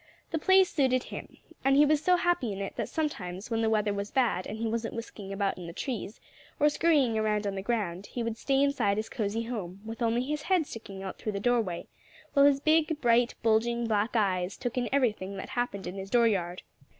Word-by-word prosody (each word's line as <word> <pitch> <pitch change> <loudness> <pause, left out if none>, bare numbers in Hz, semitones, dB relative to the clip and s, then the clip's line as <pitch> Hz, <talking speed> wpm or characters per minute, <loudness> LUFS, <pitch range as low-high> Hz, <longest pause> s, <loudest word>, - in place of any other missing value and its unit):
The 320 - 0
place 380 +3 +5
suited 260 -5 +2
him. - - -9 0.3
And 270 0 +4
he 295 - +7
was 300 0 +2
so 365 - +5
happy 350 - +1
in 195 - -5
it 195 - -4
that - - -3
sometimes 205 - -3
when 225 0 +1
the 225 - +2
weather 210 -2 +1
was 200 0 -3
bad 240 -8 +1
and 215 - -5
he 230 - -3
wasn't 225 +1 -2
whisking 215 -4 -7
about 195 -1 -1
in 175 - -7
the 170 - -7
trees, 225 -1 -4 0.4
or 295 - +5
scurrying 290 -8 +2
around 210 -1 0
on 200 - -1
the 195 - -3
ground, 200 -4 -2
he 240 - -4
would 230 -1 -2
stay 270 +3 +1
inside 265 -8 +1
his 220 +1 -3
cozy 215 +1 -2
home, 200 -6 -5
with 225 +2 -7
only 235 +1 +2
his 300 +3 -3
head 360 -1 +2
sticking 195 -6 -8
out 190 - -6
through 215 - -3
the 200 - -2
doorway, 220 -6 0 0.5
while 280 0 +6
his 280 -1 +3
big, 315 +1 +2
bright, 240 -1 +3
bulging, 235 +1 +2
black 220 +1 0
eyes 190 -4 +1
took 245 +1 -3
in 245 -2 -1
everything 210 -8 0
that 190 - -6
happened 245 -6 -2
in 180 - -4
his 195 0 -7
dooryard. 195 -7 +1
230 Hz, 220 wpm, -29 LUFS, 200-270 Hz, 0.5 s, he